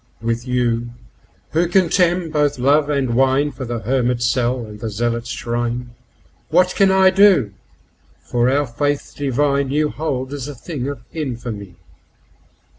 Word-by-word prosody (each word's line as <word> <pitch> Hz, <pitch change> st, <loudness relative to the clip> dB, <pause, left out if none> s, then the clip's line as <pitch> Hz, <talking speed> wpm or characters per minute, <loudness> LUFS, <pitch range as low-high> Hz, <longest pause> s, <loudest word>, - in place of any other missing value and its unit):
With 115 Hz, +2 st, -2 dB
you, 120 Hz, -2 st, 0 dB, 0.6 s
who 170 Hz, +2 st, +2 dB
contemn 175 Hz, -1 st, +2 dB
both 145 Hz, -2 st, +1 dB
love 145 Hz, +4 st, +3 dB
and 140 Hz, -3 st, 0 dB
wine2 135 Hz, +4 st, +2 dB
for 130 Hz, -, -6 dB
the 120 Hz, -1 st, -4 dB
hermit's 120 Hz, +1 st, 0 dB
cell 125 Hz, -1 st, 0 dB
and 105 Hz, -1 st, -11 dB
the 110 Hz, -, -4 dB
zealot's 115 Hz, +2 st, -2 dB
shrine, 120 Hz, +1 st, -3 dB, 0.6 s
What 180 Hz, 0 st, +3 dB
can 195 Hz, -1 st, +4 dB
I 190 Hz, 0 st, +5 dB
do, 185 Hz, -, +4 dB, 0.6 s
for 120 Hz, 0 st, 0 dB
our 145 Hz, +2 st, +2 dB
Faith 145 Hz, +3 st, -2 dB
divine 140 Hz, 0 st, 0 dB
you 150 Hz, +2 st, +1 dB
hold 135 Hz, -4 st, -3 dB
as 140 Hz, -2 st, -5 dB
a 145 Hz, -, -7 dB
thing 135 Hz, 0 st, -5 dB
of 140 Hz, -4 st, -6 dB
infamy? 120 Hz, -, -5 dB
130 Hz, 145 wpm, -19 LUFS, 120-150 Hz, 0.6 s, I